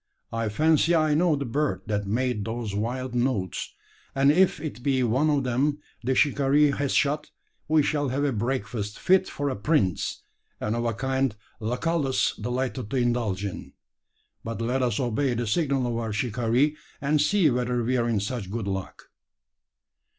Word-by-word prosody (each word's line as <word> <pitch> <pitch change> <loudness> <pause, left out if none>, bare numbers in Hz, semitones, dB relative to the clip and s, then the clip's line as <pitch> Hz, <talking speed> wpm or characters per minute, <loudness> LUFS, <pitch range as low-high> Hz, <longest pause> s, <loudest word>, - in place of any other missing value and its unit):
I 115 -1 -1
fancy 160 +8 +3
I 155 -2 +3
know 165 +1 +3
the 140 -1 -3
bird 145 +5 -1
that 105 -2 -2
made 120 0 0
those 115 -2 -4
wild 125 +5 -2
notes: 120 -7 -1 0.4
and 135 +1 +5
if 180 +1 +3
it 145 -5 -6
be 130 0 +1
one 130 +7 +2
of 145 -2 +2
them 135 +4 +1 0.3
the 130 +2 +1
shikaree 145 +1 +4
has 140 0 -1
shot, 150 +1 +1 0.4
we 155 -1 +4
shall 145 -1 0
have 135 +3 -1
a 145 - +2
breakfast 115 -2 -2
fit 190 0 +3
for 145 - -3
a 135 - -1
prince, 100 - 0 0.4
and 105 +2 -1
of 120 0 -1
a 115 -2 0
kind 130 -2 0 0.2
Lucullus 135 +5 0
delighted 125 -2 -3
to 135 - -1
indulge 120 -5 0
in. 100 - -6 0.7
But 115 -2 -5
let 125 +3 0
us 120 -4 0
obey 125 +1 0
the 120 +1 -1
signal 135 +2 +1
of 120 -1 -1
our 115 -1 -2
shikaree, 120 +6 +1 0.2
and 145 +1 +2
see 165 -1 +3
whether 125 0 0
we're 120 0 +1
in 110 -4 +1
such 100 -2 -4
good 110 -1 -3
luck." 95 -1 -4
125 Hz, 170 wpm, -26 LUFS, 115-145 Hz, 0.7 s, and